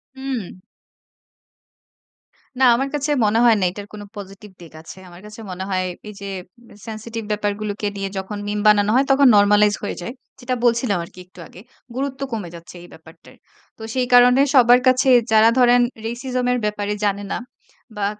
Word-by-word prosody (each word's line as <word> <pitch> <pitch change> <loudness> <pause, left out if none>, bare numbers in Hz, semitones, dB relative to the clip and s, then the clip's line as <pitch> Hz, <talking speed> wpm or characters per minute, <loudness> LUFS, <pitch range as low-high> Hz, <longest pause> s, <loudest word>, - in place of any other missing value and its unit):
হু। 260 -9 -6 2.0
না - - +2
আমার 270 +3 -2
কাছে 295 +1 -2
মনে 215 +2 +2
হয় 230 - +6
না। - - -1
এটার 205 +1 -9
কোন 210 - -9
পজিটিভ 200 0 -11
দিক 165 -2 -14
আছে। 165 - -12
আমার 175 +1 -14
কাছে 210 +1 -12
মনে 185 +1 -6
হয় 185 -1 -1 0.3
এই - - -9
যে 200 - -6 0.6
Sensitive 225 0 -7
ব্যাপারগুলোকে 210 0 -3
নিয়ে 195 -1 -4
যখন 190 +2 -5
মিম 205 0 -2
বানানো 205 -1 +4
হয়, 270 - +3
তখন 275 0 +5
normalize 205 +1 +4
হয়ে - - -4
যায়। 235 +7 -6 0.3
যেটা 255 0 -3
বলছিলাম 235 -4 +1
আরকি 175 +2 -14
একটু 180 0 -19
আগে। 185 - -15 0.3
গুরুত্ব 275 0 -4
কমে 210 -7 -5
যাচ্ছে 170 +1 -13
এই - - -13
ব্যাপারটায়। 160 0 -17 0.4
তো - - -16
সেই 255 -1 -1
কারণে 250 +2 +6
সবার 245 -1 +6
কাছে 255 +1 +3 0.2
যারা 220 +1 +6
ধরেন 245 0 +5 0.2
Racism 250 +2 -3
এর 250 - +1
ব্যাপারে 210 0 -2
জানে 200 0 -1
না - - -1 0.6
বা 205 - -2
210 Hz, 170 wpm, -20 LUFS, 200-245 Hz, 2.0 s, হয়